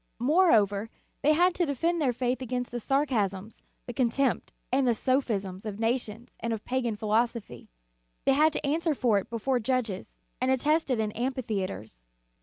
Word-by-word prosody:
Moreover, 225 - +3 0.3
they 305 - +4
had 355 +3 +4
to 350 - +1
defend 330 +5 0
their 270 -4 +3
faith 250 +1 -1
against 250 0 -3
the 240 - -3
sarcasms, 220 -7 -1 0.2
the 245 - -6
contempt, 255 +1 +1 0.2
and 260 0 +2
the 235 - +3
sophisms 215 -8 -1
of 210 -2 -5
nations 230 -1 -2
and 230 - -2
of 220 -2 -4
pagan 245 -3 -1
philosophy. 220 - -1 0.6
They 270 - +5
had 305 +3 +4
to - - -3
answer 315 +2 +1
for 230 -6 +3
it - - -9
before 240 +3 0
judges, 235 -5 -2 0.2
and 255 - +1
attest 295 +5 +2
it 250 -3 +1
in 215 -1 0
amphitheatres. 210 - -3
245 Hz, 165 wpm, -28 LUFS, 215-270 Hz, 0.6 s, They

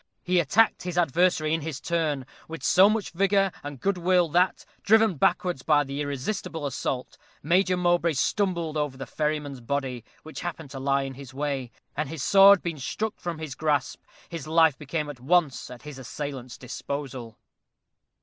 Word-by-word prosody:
He 180 0 +2
attacked 210 +8 +3
his 180 -1 -5
adversary 170 -1 +2
in 165 - 0
his 150 -3 -5
turn, 155 -6 -1 0.2
with 165 0 -8
so 190 +3 +6
much 215 -1 -1
vigor 195 +1 +2
and 145 -2 -7
good 195 +3 0
will, 180 -1 +3
that, 180 +4 +1 0.2
driven 220 +1 +4
backwards 175 +1 +1
by 145 0 +3
the 140 +1 -5
irresistible 145 +3 -3
assault, 130 -2 -3 0.2
Major 180 +4 +3
Mowbray 175 -2 +2
stumbled 170 +1 0
over 145 -3 -2
the 135 - -6
ferryman's 150 -3 -3
body, 130 -1 -3 0.2
which 155 - -8
happened 160 -5 -6
to 135 - -6
lie 135 +1 +1
in 135 0 -5
his 130 -1 -11
way; 140 -3 -2 0.3
and 150 -1 -2
his 155 -3 -5
sword 200 -1 +7
being 165 -4 -4
struck 215 +11 -3
from 175 -2 -4
his 155 -3 -6
grasp, 150 -1 -1 0.3
his 165 -4 -7
life 160 -2 +4
became 150 +2 -3
at 145 -4 -8
once 150 0 +1
at 125 -1 -11
his 150 -2 -9
assailant's 130 -1 -6
disposal. 130 -3 -6
155 Hz, 170 wpm, -26 LUFS, 140-175 Hz, 0.3 s, sword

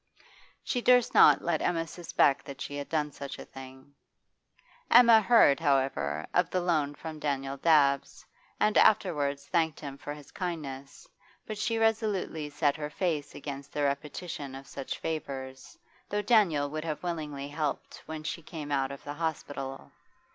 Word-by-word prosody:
She 245 - -1
durst 250 -1 +4
not - - +7
let 170 -3 0
Emma 165 -2 0
suspect 160 -4 +1
that 140 - -8
she 145 - -5
had 145 0 -5
done 150 -2 0
such 140 -1 -7
a - - -9
thing. 130 +1 -12 1.0
Emma 235 -2 +8
heard, 215 -10 +5
however, 135 - 0
of - - +3
the 185 - 0
loan 155 -5 0
from 160 0 -8
Daniel 135 -2 -2
Dabbs, 140 -3 +2 0.3
and 210 - +4
afterwards 150 -10 +2
thanked 160 0 0
him 140 -2 -8
for 145 - -6
his 145 -2 -14
kindness, 145 -7 -6 0.4
but 215 -1 -6
she 225 +1 0
resolutely 215 -9 0
set 145 0 +1
her 150 -1 -4
face 155 -3 -2
against 140 -1 -7
the 145 - -1
repetition 140 0 -3
of 135 0 -9
such 135 0 -6
favours, 135 -4 -6 0.3
though 205 0 -1
Daniel 190 -10 +3
would 155 0 -4
have 160 0 -4
willingly 150 -5 -4
helped 150 0 -4
when 155 -1 -6
she 160 - -4
came 150 -2 -7
out 135 -1 0
of 140 - -9
the 145 - -5
hospital. 145 -4 -5
150 Hz, 160 wpm, -29 LUFS, 140-170 Hz, 1.0 s, Emma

